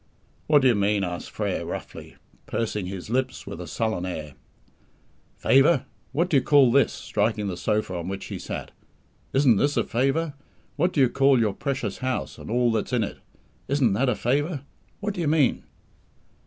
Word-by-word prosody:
"What 150 -2 +5
do - - +6
you 125 - +5
mean?" 100 -1 +1
asked 90 -1 -4
Frere - - -2
roughly, - - -7 0.3
pursing 105 -4 -2
his 95 +2 -6
lips 130 +1 -1
with 80 - -7
a 90 - -7
sullen 110 -5 -1
air. 80 -5 -5 1.0
"Favour! 135 +2 +4 0.3
What 170 +4 +1
do 155 - +3
you - - +4
call 140 -4 +5
this?" 140 +2 +4
striking 105 0 -1
the 95 -3 -2
sofa 105 +1 -1
on 85 0 -5
which 95 +1 -5
he - - -6
sat. - - -6 0.6
"Isn't 135 -5 +4
this 145 +7 +1
a - - +3
favour? 135 +6 0 0.4
What 175 +5 +1
do 145 - +1
you 130 - +6
call 135 0 +4
your 110 -3 +1
precious 125 -5 -3
house 130 -1 -3
and - - -9
all 120 +1 +2
that's 110 +3 -2
in 120 -3 +2
it? 100 - -6 0.5
Isn't 135 -6 +2
that 125 +6 +2
a 120 - +1
favour? 140 +5 0 0.4
What 205 0 -2
do 180 - -4
you 165 - 0
mean?" 150 -3 +2
125 Hz, 185 wpm, -25 LUFS, 105-140 Hz, 1.0 s, do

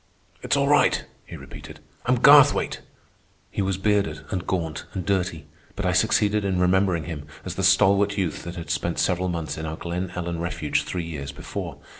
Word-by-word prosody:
"It's - - +1
all - - +2
right," - - +3 0.2
he - - -8
repeated. - - -11 0.3
"I'm 125 0 +3
Garthwaite." 145 +2 +6 0.7
He - - -2
was 95 -1 -1
bearded 100 -6 0
and 90 -1 -3
gaunt 80 -4 -2
and 90 -2 -3
dirty, 90 -5 -1 0.3
but 100 - -4
I 90 - +2
succeeded 105 +2 +2
in 95 -2 0
remembering 90 -2 +2
him 75 -3 -7 0.2
as - - -4
the - - -4
stalwart 100 +1 +4
youth 90 -5 -2
that 85 0 -6
had 85 -2 -6
spent 85 - -1
several 90 0 +1
months 85 -3 -4
in 80 - -4
our 80 0 -5
Glen 90 +1 -4
Ellen 85 -1 -3
refuge 85 -3 -1
three 90 -2 -4
years 75 -4 -6
before. - - -6
90 Hz, 185 wpm, -24 LUFS, 85-100 Hz, 0.7 s, Garthwaite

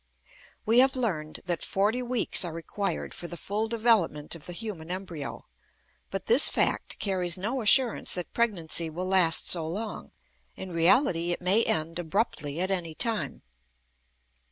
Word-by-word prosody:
We 230 +3 +4
have 265 +1 +4
learned 170 -12 -2
that 175 -2 -2
forty 210 +6 0
weeks 245 -5 0
are 175 - -4
required 165 +5 -4
for 175 - -7
the 175 - -8
full 210 +6 -3
development 220 -10 +1
of 165 -3 -8
the - - -5
human 175 -5 -6
embryo, 180 -6 -6 0.6
but 195 - -5
this 245 +6 +6
fact - - 0
carries 180 -3 0
no 230 +8 -3
assurance 235 +2 +5
that 180 -1 -6
pregnancy 170 -8 -1
will 175 +4 -5
last 185 -3 +4
so 165 -3 +2
long; 210 +6 -6 0.5
in 190 -1 -8
reality, 170 - +2
it - - -5
may 190 +6 +3
end 160 +2 -1
abruptly 160 -4 -2
at 185 +2 -1
any 170 -4 -2
time. 215 - -1
185 Hz, 155 wpm, -27 LUFS, 165-225 Hz, 0.6 s, this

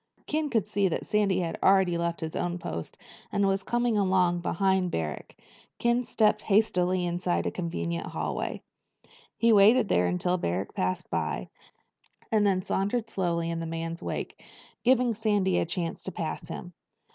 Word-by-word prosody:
Ken 305 0 -1
could 225 -6 +1
see 200 -1 +1
that 175 - -2
Sandy 200 -3 +2
had 165 -2 -3
already 190 -2 +4
left 170 0 -2
his 160 -1 -4
own 175 0 -1
post 85 - -6 0.3
and 200 - +2
was 195 0 +1
coming 240 0 +1
along 185 -3 +2
behind 190 +1 +1
Barrack. 80 - -4 0.4
Ken 240 +1 +1
stepped 215 -2 +2
hastily 185 -4 +2
inside 175 0 -1
a - - 0
convenient 85 - -3
hallway. - - -3 0.7
He 230 -1 +4
waited 215 +2 +6
there 90 0 +3
until 90 - 0
Barrack 90 - -2
passed 90 0 -2
by, - - -2 0.8
and 215 -2 +3
then 185 -2 +1
sauntered 220 +5 -1
slowly 170 -3 -1
in 165 - -3
the 165 - -4
man's 165 +1 -4
wake, - - -5 0.4
giving 250 -1 +4
Sandy 205 -4 +1
a - - -1
chance 170 -1 -3
to 190 - -6
pass 165 -1 -4
him. 175 +2 -7
185 Hz, 160 wpm, -28 LUFS, 170-210 Hz, 0.8 s, waited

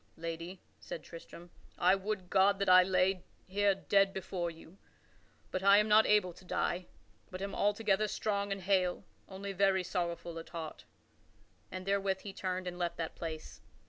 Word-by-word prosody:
"Lady," 165 +3 -6 0.2
said - - -7
Tristram, 170 +1 -12 0.3
"I 180 +2 +5
would 195 -1 -3
God 195 +1 +4
that 200 0 -1
I 185 0 +9
lay 185 0 +2 0.2
here 200 +1 +2
dead 195 0 +2
before 180 -2 -3
you. 165 +3 -14 0.7
But 185 - -2
I 200 +1 +7
am 210 +1 +4
not 215 +1 +6
able 205 -4 +3
to 180 - -16
die, 180 0 -1 0.4
but 185 - -7
am 195 +1 -4
altogether 205 0 +1
strong 200 -1 -1
and 195 -1 -3
hale 185 -1 +1 0.3
only 195 +1 -6
very 190 -1 +3
sorrowful 170 -2 -3
at 165 - -10
heart." 165 -2 -7 0.8
And 185 +7 -6
therewith 195 -1 0
he 200 - -7
turned 185 -1 -3
and 175 0 -5
left 175 -1 -2
that 165 -1 -3
place. 160 -2 -7
190 Hz, 170 wpm, -33 LUFS, 175-200 Hz, 0.8 s, I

